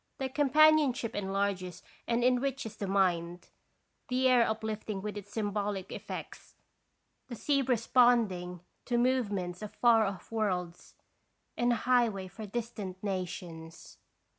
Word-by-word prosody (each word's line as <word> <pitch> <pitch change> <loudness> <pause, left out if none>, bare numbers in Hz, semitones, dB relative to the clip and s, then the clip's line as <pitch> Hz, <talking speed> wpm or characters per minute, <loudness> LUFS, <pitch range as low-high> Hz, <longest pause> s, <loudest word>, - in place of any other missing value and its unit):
Their 265 -1 -2
companionship 290 -3 +4
enlarges 195 -2 -2 0.2
and 235 0 +1
enriches 255 -2 0
the 200 - -4
mind, 180 -3 0 0.6
the 255 +1 +2
air 245 -2 +5
uplifting 220 -2 -3
with 210 -1 -4
its 205 -1 -8
symbolic 205 -3 -2
effects, - - -8 0.7
the 245 - -6
sea 275 +4 +1
responding 230 -8 +2 0.2
to 240 - 0
movements 205 -8 0
of 210 - -8
far 230 -2 +5
off 195 0 -6
worlds, 180 -6 -3 0.6
and 240 0 +2
a - - +3
highway 235 -7 +2
for 205 +4 -9
distant 205 -4 -5
nations. 175 -4 -6
215 Hz, 120 wpm, -30 LUFS, 190-245 Hz, 0.7 s, air